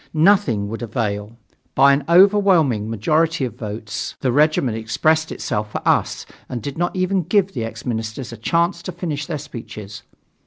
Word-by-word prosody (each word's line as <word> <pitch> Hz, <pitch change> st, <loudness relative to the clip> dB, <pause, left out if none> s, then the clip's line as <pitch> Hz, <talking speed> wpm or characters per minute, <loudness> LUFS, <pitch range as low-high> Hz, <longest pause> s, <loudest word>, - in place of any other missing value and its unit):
Nothing 155 Hz, -, +3 dB
would 115 Hz, +3 st, -6 dB
avail. 105 Hz, -1 st, -3 dB, 0.4 s
By 140 Hz, +1 st, +6 dB
an 140 Hz, +1 st, 0 dB
overwhelming 175 Hz, -, +4 dB
majority 155 Hz, +8 st, +1 dB
of 120 Hz, -, -5 dB
votes, 110 Hz, +2 st, -6 dB
the 130 Hz, -, +1 dB
regiment 145 Hz, -4 st, +2 dB
expressed 155 Hz, +8 st, +1 dB
itself 105 Hz, 0 st, -3 dB
for -, -, -4 dB
us -, -, +1 dB, 0.2 s
and 125 Hz, -, -3 dB
did 135 Hz, +5 st, -6 dB
not 175 Hz, +2 st, -1 dB
even 185 Hz, +1 st, +1 dB
give 195 Hz, +3 st, +1 dB
the 120 Hz, -, -3 dB
ex 115 Hz, -, -7 dB
ministers 115 Hz, +1 st, -4 dB
a -, -, -8 dB
chance 170 Hz, -, 0 dB
to 185 Hz, -, -6 dB
finish 155 Hz, -4 st, -4 dB
their 155 Hz, -, -3 dB
speeches. 110 Hz, -7 st, -9 dB
135 Hz, 165 wpm, -20 LUFS, 110-170 Hz, 0.4 s, By